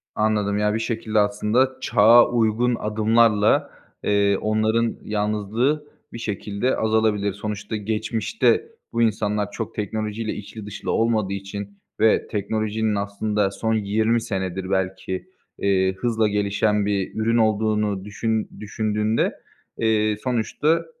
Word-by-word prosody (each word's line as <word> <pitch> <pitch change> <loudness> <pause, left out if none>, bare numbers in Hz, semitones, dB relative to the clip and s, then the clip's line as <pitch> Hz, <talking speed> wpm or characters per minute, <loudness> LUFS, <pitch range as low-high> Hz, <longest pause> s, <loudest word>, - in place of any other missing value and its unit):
Anladım. 105 -1 +1
Ya, 105 0 +1
bir 110 - 0
şekilde 115 -2 -1
aslında 105 +6 +2
çağa 115 +2 +6
uygun 120 +1 +2
adımlarla, 110 0 +2 0.3
eee, 100 -1 +2
onların 110 +2 +1
yalnızlığı 110 +8 -1 0.3
bir - - -6
şekilde 105 +3 -2
azalabilir. 110 -2 +1
Sonuçta 105 +1 -5
geçmişte 110 - 0 0.2
bu 115 - +1
insanlar 105 -2 0
çok 115 +1 -5
teknolojiyle 110 +1 -3
içli 105 +1 -8
dışlı 105 -1 -5
olmadığı 110 -4 +1
için 100 +1 -7 0.2
ve 110 0 +3
teknolojinin 110 +1 -1
aslında 100 0 -1
son 110 +3 -1
20 110 +2 +1
senedir 95 -3 -3
belki, 95 -1 -2 0.3
eee, 95 -1 +2
hızla 115 -1 +1
gelişen 105 0 +1
bir 100 -2 -1
ürün 115 +2 +1
olduğunu 105 -2 +1
düşün 110 +1 -2
düşündüğünde, 105 +1 0 0.4
eee, 110 -1 +2
sonuçta, 130 +6 0
105 Hz, 115 wpm, -23 LUFS, 100-110 Hz, 0.4 s, çağa